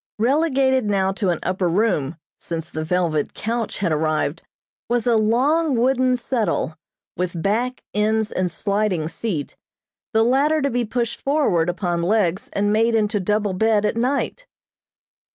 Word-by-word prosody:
Relegated 265 0 +2
now 195 -2 +1
to 195 -1 -1
an 175 - +1
upper 185 -1 0
room, 170 -6 0 0.2
since 165 -1 -5
the 155 - -3
velvet 165 -3 0
couch 230 0 -3
had 185 -4 0
arrived, 155 +1 0 0.5
was 240 -2 +1
a 240 -2 +3
long, 265 +8 +2
wooden 255 +1 +2
settle, 220 - -1 0.4
with 180 -1 -3
back, 235 +8 -1
ends 215 +1 +1
and 185 -1 0
sliding 200 -2 -1
seat, 165 -2 -4 0.6
the 220 -1 +3
latter 280 +6 +3
to 280 -1 0
be 240 0 0
pushed 235 +1 -3
forward 270 - +1
upon 175 -1 -1
legs 190 0 +1
and 205 +1 +1
made 225 +1 +3
into 210 -1 +1
double 210 +1 0
bed 215 +2 +2
at 210 - 0
night. 275 - -1
215 Hz, 150 wpm, -22 LUFS, 180-245 Hz, 0.6 s, a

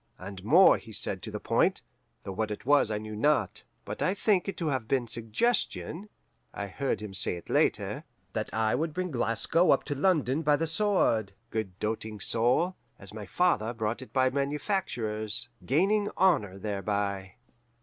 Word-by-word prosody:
And 95 0 -9
more 170 - +6
he 110 - -13
said 100 -2 -3
to - - -7
the - - -5
point, - - +1 0.4
though 95 - -5
what 110 +3 -2
it 105 +3 -6
was 145 -4 +4
I 105 - -1
knew 110 0 -6
not. 150 +8 +1 0.2
But - - -6
I 185 - +1
think 205 -3 +2
it 195 - -4
to 165 -3 -1
have 130 -5 -2
been 130 0 +1
suggestion 160 - -1 0.5
(I 100 - -3
heard 130 +5 -2
him 105 -2 -7
say 95 - 0
it 85 - -9
later) - - +1 0.3
that - - -3
I 110 0 +1
would 155 +4 -1
bring 185 -1 -2
Glasgow 130 +8 +2
up - - +4
to 145 - -3
London 150 -2 +1
by 150 -2 +3
the 165 - -1
sword 160 - +1 0.2
(good 95 -5 -3
doting 110 0 -3
soul!) 125 - +2 0.2
as 100 +1 -9
my 105 -2 -7
father 120 - +1
brought 110 +2 -2
it 130 - -11
by 130 -1 +2
manufactures, 120 - -2 0.2
gaining 200 +9 +2
honour 135 - +2
thereby. 100 -1 -2
120 Hz, 175 wpm, -29 LUFS, 105-160 Hz, 0.5 s, more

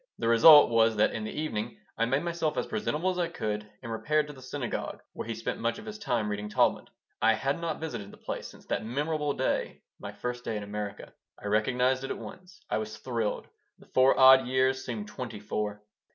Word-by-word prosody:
The - - -2
result 130 +5 +8
was 115 -1 +4
that 105 - +3
in 110 - -4
the 110 - -5
evening 115 -7 -3 0.2
I 115 - +1
made 135 +6 0
myself 170 -3 -1
as - - 0
presentable 185 -4 -1
as 180 - -4
I 175 - +1
could, 105 -9 -4
and 115 - -6
repaired 150 +7 +1
to 150 - -9
the 130 - -14
synagogue 130 -1 -4
where - - -6
he 115 - -3
spent 115 - -4
much 115 0 -1
of 210 - -10
his 215 0 -7
time 120 - 0
reading 105 0 -3
Talmud - - +2 0.3
I 115 +1 +5
had 135 +8 -1
not 165 -2 -2
visited 120 -11 -5
the - - -14
place - - -5
since - - -15
that - - -2
memorable 145 +5 -1
day, 130 - -2 0.2
my - - -6
first 125 0 -5
day 110 - -2
in 105 - -5
America. 105 0 -6 0.2
I - - -13
recognized 125 +5 +1
it 135 - -4
at - - -3
once. 180 -1 -11
I - - 0
was 110 0 -5
thrilled. 115 -2 -2 0.3
The - - -18
four 130 +1 +5
odd 130 -1 +8
years 130 +1 +2
seemed 110 -4 -5
twenty 110 -1 -6
four. 105 0 -3
125 Hz, 220 wpm, -29 LUFS, 110-150 Hz, 0.3 s, result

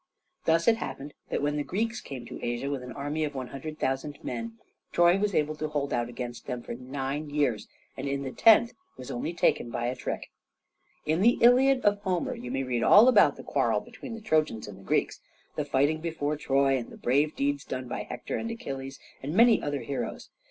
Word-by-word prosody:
Thus 165 +1 +3
it 225 -1 +5
happened 145 -9 -6 0.2
that - - -1
when 145 0 0
the 145 - 0
Greeks 225 +9 -2
came 130 -4 -8
to 125 - -8
Asia 120 +4 -2
with 140 -2 -3
an 125 0 -8
army 145 +3 -2
of 145 -2 -3
100,000 135 +1 -4
men, 230 0 -5 0.3
Troy 175 +2 +4
was 205 -1 0
able 150 0 +1
to 155 - -2
hold 145 -2 -2
out 120 0 0
against 120 0 -7
them 125 -1 -4
for - - -6
nine 135 +4 -4
years, 145 -7 0 0.3
and - - -4
in 140 0 -2
the 135 - -4
tenth 225 - +5 0.2
was 125 - -7
only 125 +7 -3
taken 165 -7 +1
by 120 0 -3
a 125 +1 -1
trick. 125 - -5 0.7
In 155 +3 +1
the 235 +4 +5
"Iliad" 255 +2 +5
of 205 0 +4
Homer 185 -3 -1
you 125 - -7
may 135 +1 -1
read 125 -2 -1
all 210 - +8
about 255 - +6
the - - -10
quarrel - - +1
between 240 -3 -9
the 225 - -9
Trojans 155 - 0
and 100 -1 -11
Greeks, - - +1 0.4
the - - -1
fighting 145 +4 +2
before 155 -3 -2
Troy 135 -2 +2
and 120 - -7
the - - -12
brave 145 +5 +1
deeds 140 0 0
done 130 -1 -5
by - - -3
Hector - - -5
and 230 - -3
Achilles, 135 -11 -6 0.2
and 145 +5 -4
many 235 +1 +6
other 145 -1 -2
heroes. 140 - -5
145 Hz, 210 wpm, -28 LUFS, 130-175 Hz, 0.7 s, all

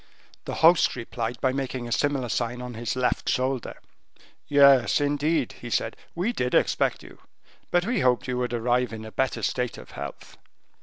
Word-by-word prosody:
The - - -4
host 170 0 +5
replied 115 -1 -4
by 130 -1 +2
making 130 -2 -3
a - - -8
similar 140 -1 0
sign 120 +2 -2
on 125 0 -6
his 120 +2 -3
left 125 -1 0
shoulder. 130 -1 -1 0.7
"Yes, 140 -6 +5
indeed," 145 0 0
he 120 - -6
said, 115 - -1 0.2
"we 190 +8 -1
did 125 - -1
expect - - +1
you, - - -14 0.5
but 175 0 +2
we 235 -1 0
hoped 125 -5 +3
that - - -9
you 125 0 -1
would 125 -1 -1
arrive 120 0 0
in 110 0 -7
a 110 - -9
better 130 +3 -1
state 125 -1 -1
of - - -12
health." 70 0 -8
125 Hz, 185 wpm, -26 LUFS, 120-140 Hz, 0.7 s, host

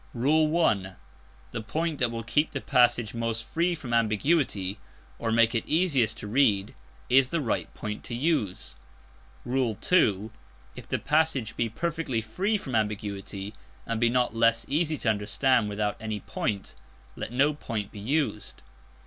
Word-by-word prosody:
(1) 145 - +2 0.6
The 115 - -4
point 155 +7 -2
that 125 - +3
will 115 0 -5
keep 150 +7 +1
the - - -2
passage 120 -4 +3
most 115 -1 -2
free 170 +7 +1
from 130 -7 -6
ambiguity, 110 - +1 0.4
or 115 - -1
make 115 +1 +4
it 115 - +1
easiest 140 - +2
to 105 - -7
read, 105 -4 +2 0.3
is 130 0 +5
the 165 +5 -1
right 125 -7 -2
point 105 0 -5
to 120 - -4
use. 105 - -1 0.7
(2) 115 - +1 0.4
_If - - -10
the - - 0
passage 150 -7 +1
be 115 -1 0
perfectly 160 -1 -2
free 185 - -1
from 135 -10 -7
ambiguity 105 -2 -3 0.3
and 115 0 -2
be 120 - +4
not 125 -1 +1
less 115 0 +3
easy 155 +2 0
to 120 - 0
understand 110 +3 +1
without 105 0 -1
any 110 -2 -4
point, 100 0 -3 0.4
let - - -5
no 140 +4 +3
point 110 -8 -5
be 105 - -9
used. 135 0 -2
115 Hz, 150 wpm, -27 LUFS, 105-145 Hz, 0.7 s, is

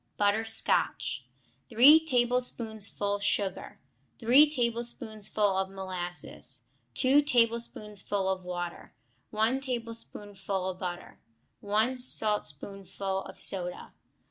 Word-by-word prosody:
Butter 205 +2 +1
Scotch 225 0 +3 0.4
3 280 +8 +7
tablespoonfuls 225 -5 0
sugar. 200 -1 -1 0.4
3 265 +6 +5
tablespoonfuls 225 -6 -1
of 190 - -5
molasses. 185 -2 -3 0.2
2 275 +2 +4
tablespoonfuls 230 -5 0 0.3
of - - -20
water. 175 -1 -7 0.3
1 220 +5 0
tablespoonful 205 -6 -5
of 185 - -13
butter. 175 -1 -7 0.4
1 220 +5 -1
saltspoonful 195 - -2
of - - -12
soda. 180 -2 -2
215 Hz, 90 wpm, -28 LUFS, 195-240 Hz, 0.4 s, 3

